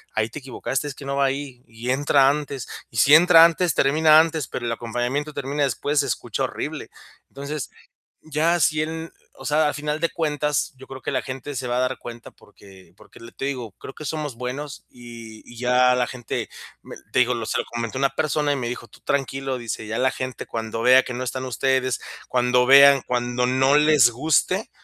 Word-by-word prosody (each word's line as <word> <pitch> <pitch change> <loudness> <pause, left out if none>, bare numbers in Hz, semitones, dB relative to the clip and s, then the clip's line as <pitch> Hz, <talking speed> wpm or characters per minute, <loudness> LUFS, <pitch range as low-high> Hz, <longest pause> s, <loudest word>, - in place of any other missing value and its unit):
ahí 110 0 +1
te 150 - -8
equivocaste, 135 +1 -4
es 140 - -6
que 140 - -11
no 140 0 -3
va 140 - +3
ahí". 135 -2 -4
Y 115 +2 -5
entra 140 0 +3
antes, 140 -3 -3 0.2
y 115 - -10
si 135 +7 +5
entra 165 0 +8
antes, 170 -1 +1
termina 155 +3 +5
antes, 160 -3 0
pero 120 - -5
el 115 - -1
acompañamiento 120 +6 -3
termina 140 +1 -3
después, 145 +2 0
se 140 - +1
escucha - - -3
horrible. - - -6 0.4
Entonces, 140 0 -6 0.5
ya 160 +3 0
si 155 +1 +2
él 160 +1 -5 0.2
o - - -11
sea, 150 +1 +2
al - - -3
final 150 +1 -3
de 165 0 0
cuentas, 150 -3 -1
yo 130 +1 -13
creo 130 0 -9
que - - -4
la - - -1
gente 135 +2 -7
se 125 - -4
va 125 0 -1
a - - +1
dar 130 +1 -1
cuenta 120 0 -10
porque 95 -3 -19
porque - - -17 0.2
te 135 - -3
digo, 125 -6 -4
creo - - -10
que 155 - -10
somos 150 -4 -4
buenos, 130 +3 -6
y 115 -2 -12
y 120 - -13
ya 125 +1 +3
la 125 -1 +1
gente, 120 -4 -5 0.3
me - - -11 0.2
te - - +3
digo, 125 0 +3
lo 115 -2 -4
se - - -1
lo - - -1
comenté 115 +1 -5
a - - -4
una 135 0 +2
persona 150 0 0
y 140 - 0
me 120 -3 -3
dijo: 125 -1 -6
"Tú - - -19
tranquilo", 135 -1 -2
dice: 115 -2 -5
"Ya 110 +2 -3
la 130 +1 +2
gente 130 -2 -6
cuando 115 0 -4
vea 130 +2 +6
que 125 - -7
no 125 +1 -4
están 130 +1 -4
ustedes, 130 +1 0 0.3
cuando 125 0 +2
vean, 140 0 +8
cuando 120 0 -1
no 130 +2 +3
les 150 -5 +5
guste, 160 - 0
135 Hz, 215 wpm, -23 LUFS, 125-150 Hz, 0.5 s, entra